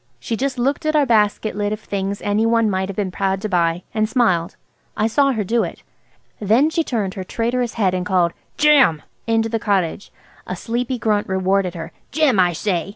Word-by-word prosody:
She 225 - -3
just 265 +2 -2
looked 275 +5 0
at 310 - +1
our 295 -2 +4
basket 215 -2 +1
lid 205 0 -1
of 215 - -3
things 200 -1 -4
any 205 +2 +1
one 230 -1 +2
might 190 0 -1
have 200 - -5
been 195 -2 -2
proud 195 0 -1
to - - 0
buy, 170 -1 +1
and 215 -1 0
smiled. 185 -10 +1 0.4
I 215 - +1
saw 275 +5 +3
her 220 -3 -1
do 230 +4 +1
it. - - -7 0.6
Then 230 +9 +3
she 330 0 +1
turned 210 -9 -2
her 190 - -5
traitorous 240 +4 -2
head 195 -5 +1
and 180 -1 -1
called 180 -3 +1 0.2
"Jim!" 280 - +4 0.2
into 225 0 +2
the 225 0 -2
cottage. 195 -3 -1 0.4
A - - -3
sleepy 245 +2 -3
grunt 210 -3 0
rewarded 190 -1 0
her. 165 -1 -7 0.2
"Jim, 280 -8 +2
I 180 -1 +4
say!" 180 +1 -2
210 Hz, 205 wpm, -20 LUFS, 190-235 Hz, 0.6 s, our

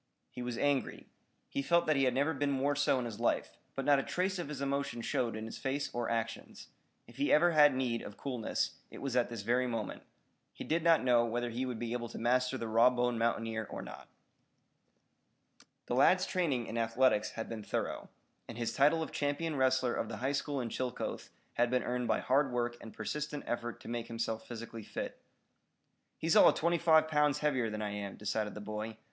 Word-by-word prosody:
He 125 - -7
was 120 -1 -3
angry. 145 -1 0 0.4
He - - -2
felt 170 +5 +3
that 155 - +3
he 135 -1 +3
had 125 - +2
never 145 +4 +2
been 145 0 0
more 140 +1 +1
so 145 -2 +2
in 125 - -2
his 115 -3 -6
life, - - 0 0.2
but 135 - -3
not 145 -1 +5
a - - +1
trace 185 +1 -1
of 170 - -4
his 150 -3 -5
emotion 140 -3 -2
showed 115 -2 -1
in 110 0 -5
his 110 - -7
face 140 +2 -2
or 120 -1 -2
actions. 115 -1 -4 0.4
If - - -17
he 145 - +1
ever 175 +3 +5
had 150 -4 +6
need 125 -3 -1
of 105 - -9
coolness, 125 -5 -2
it - - -11
was 135 -3 -3
at 125 -1 +2
this 115 -4 -6
very 125 +3 +2
moment. 115 -4 -4 0.5
He - - -7
did 165 +2 0
not 165 -3 +5
know 120 -2 +4
whether 120 +1 -2
he 125 +3 -2
would 125 -3 -3
be 115 +1 -3
able 120 -1 -3
to - - -8
master 125 +2 +1
the 115 - -4
raw 115 +3 +6
boned 125 -1 0
mountaineer 115 -2 -1
or - - -6
not. - - -10 1.8
The - - -3
lad's 180 +9 +5
training 145 -10 0
in 115 - -3
athletics 115 -1 +2
had 115 - -5
been 115 -2 -5
thorough, - - -3 0.4
and 115 - -8
his 115 -1 -2
title 150 +4 +4
of - - -7
champion 145 +2 -1
wrestler 130 -2 +2
of 110 - -2
the 110 - -5
high 130 +4 -1
school 140 -1 -1
in 120 - -3
Chillicothe 125 +1 -4 0.3
had 120 0 +2
been 125 0 +1
earned 125 -1 -1
by - - +1
hard 135 +1 +2
work 120 -1 -1
and 110 - -9
persistent 150 +6 -4
effort 120 -1 -3
to - - -11
make 115 -1 -3
himself 115 -1 -3
physically 115 -1 -7
fit. - - -6 1.0
"He's 165 0 +1
all - - +9
of - - +1
twenty 170 +1 +1
five 160 -1 +5
pounds 150 -2 +2
heavier 130 -6 +1
than 105 0 -4
I 105 - -2
am," 100 -1 -5
decided 105 0 -2
the 105 - -6
boy. 110 +1 -5
125 Hz, 215 wpm, -33 LUFS, 115-145 Hz, 1.8 s, all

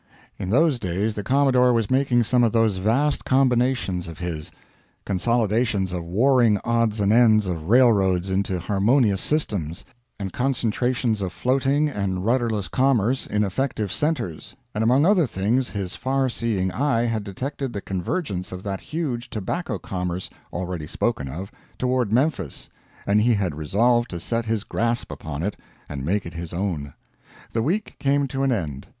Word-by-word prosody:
In 95 - -3
those 140 - +3
days 100 +3 -1
the 105 - -4
Commodore 130 +1 +3
was 115 -2 0
making 130 -2 +3
some 120 +2 +3
of 115 - +3
those 115 -4 +2
vast 120 +10 +1
combinations 125 -8 +1
of 85 -2 -8
his 85 -3 -5 0.6
consolidations 105 -1 +1
of 90 -2 -3
warring 115 +4 +3
odds 115 -2 +1
and 100 +1 +3
ends 110 -3 +5
of 85 -2 -4
railroads 100 -7 +4
into 95 -1 0
harmonious 100 +3 +2
systems, 100 - -2 0.3
and 95 -2 -4
concentrations 125 -2 0
of 95 -2 -2
floating 135 +6 +1
and 100 -8 -2
rudderless 115 -5 +1
commerce 130 -2 +1
in 105 0 +1
effective 105 -1 -2
centers 145 - -2 0.2
and 105 - 0
among 130 +6 +4
other 180 -6 +4
things 115 +6 0
his 100 -2 -4
farseeing 115 -7 0
eye 130 -2 +1
had 115 -3 -1
detected 130 +6 -4
the 100 - -4
convergence 95 - -3
of 90 0 -7
that 100 -2 -4
huge 140 -7 -3
tobacco 115 - -3
commerce, 90 -1 -4 0.2
already 90 -3 -4
spoken 85 -4 -1
of, 90 +9 -6 0.3
toward 125 -4 0
Memphis, 120 - -1 0.3
and 105 +1 +3
he 120 +1 +3
had 95 -5 -1
resolved 115 +11 +2
to 85 - -5
set 115 +6 -2
his 110 -2 0
grasp 115 +2 -1
upon 80 0 -5
it 100 +2 -2 0.3
and 70 -2 -5
make 100 +8 0
it 85 - -7
his 85 0 -6
own. 85 -6 -3 0.6
The 115 - +1
week 185 - -1
came 140 0 +2
to 135 - -3
an 135 -1 +2
end. 75 - -3
110 Hz, 160 wpm, -23 LUFS, 95-125 Hz, 0.6 s, ends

